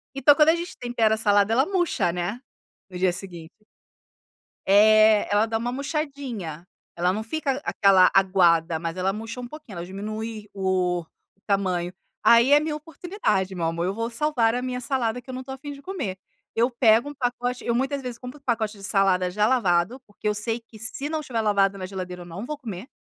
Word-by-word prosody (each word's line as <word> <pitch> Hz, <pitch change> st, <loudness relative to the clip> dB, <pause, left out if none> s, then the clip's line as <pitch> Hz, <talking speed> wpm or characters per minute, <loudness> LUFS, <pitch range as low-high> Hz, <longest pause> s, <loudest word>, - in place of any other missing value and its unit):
Então 275 Hz, +2 st, +6 dB
quando 305 Hz, +1 st, +5 dB
a 325 Hz, -, +5 dB
gente 345 Hz, +1 st, -6 dB
tempera 230 Hz, -3 st, +1 dB
a -, -, -7 dB
salada, 205 Hz, -1 st, +3 dB
ela 260 Hz, +5 st, +3 dB
murcha, 350 Hz, -, 0 dB
né, 180 Hz, +7 st, -3 dB, 0.5 s
no 180 Hz, -, -7 dB
dia 185 Hz, 0 st, +2 dB
seguinte. 175 Hz, -3 st, -8 dB, 1.1 s
É, 215 Hz, +1 st, +6 dB
ela 205 Hz, +2 st, +4 dB
dá 225 Hz, 0 st, -1 dB
uma 235 Hz, +2 st, -3 dB
murchadinha, 265 Hz, -, -4 dB, 0.3 s
ela 180 Hz, +1 st, +1 dB
não 215 Hz, +2 st, -3 dB
fica 280 Hz, +2 st, -2 dB
aquela 190 Hz, -2 st, +5 dB
aguada, 175 Hz, -4 st, +3 dB
mas 165 Hz, +1 st, -4 dB
ela 190 Hz, +1 st, 0 dB
murcha 225 Hz, +3 st, -6 dB
um 245 Hz, -, -6 dB
pouquinho, 285 Hz, -, -11 dB
ela 170 Hz, -, -5 dB
diminui 215 Hz, +3 st, -6 dB
o 185 Hz, -3 st, 0 dB, 0.4 s
tamanho. 185 Hz, -3 st, 0 dB, 0.3 s
Aí 235 Hz, +4 st, +6 dB
é 290 Hz, -, +8 dB
minha 305 Hz, 0 st, -2 dB
oportunidade, 300 Hz, -, -2 dB
meu 170 Hz, -2 st, -2 dB
amor, 165 Hz, +1 st, -1 dB
eu 190 Hz, -, -1 dB
vou 230 Hz, +2 st, -3 dB
salvar 235 Hz, -2 st, +1 dB
a 250 Hz, -, -1 dB
minha 250 Hz, 0 st, -3 dB
salada 250 Hz, -3 st, -1 dB
que 255 Hz, -, -20 dB
eu -, -, -5 dB
não 255 Hz, -, -5 dB
estou 265 Hz, +1 st, -7 dB
a -, -, -8 dB
fim 290 Hz, +2 st, -8 dB
de 280 Hz, -1 st, -10 dB
comer. 280 Hz, -, -4 dB, 0.4 s
Eu 235 Hz, +2 st, +3 dB
pego 235 Hz, +2 st, +4 dB
um -, -, -8 dB
pacote 245 Hz, -2 st, -2 dB
eu 235 Hz, -, +1 dB
muitas 270 Hz, +2 st, -1 dB
vezes 250 Hz, -2 st, -6 dB
compro 250 Hz, +4 st, -9 dB
um -, -, -38 dB
pacote 220 Hz, -3 st, -1 dB
de 200 Hz, -, -13 dB
salada 190 Hz, -2 st, +2 dB
já 210 Hz, +3 st, +1 dB
lavado, 220 Hz, -1 st, +1 dB
porque 205 Hz, +1 st, -6 dB
eu 210 Hz, -, +2 dB
sei 225 Hz, +3 st, -2 dB
que 230 Hz, -2 st, -17 dB
se 260 Hz, +6 st, -2 dB
não 315 Hz, 0 st, -2 dB
tiver 250 Hz, -6 st, -3 dB
lavado 200 Hz, -2 st, +2 dB
na 185 Hz, -, -5 dB
geladeira, 180 Hz, -2 st, -6 dB
eu -, -, -13 dB
não 175 Hz, +6 st, -7 dB
vou 300 Hz, +3 st, -5 dB
comer. 220 Hz, -5 st, -7 dB
220 Hz, 210 wpm, -24 LUFS, 190-255 Hz, 1.1 s, é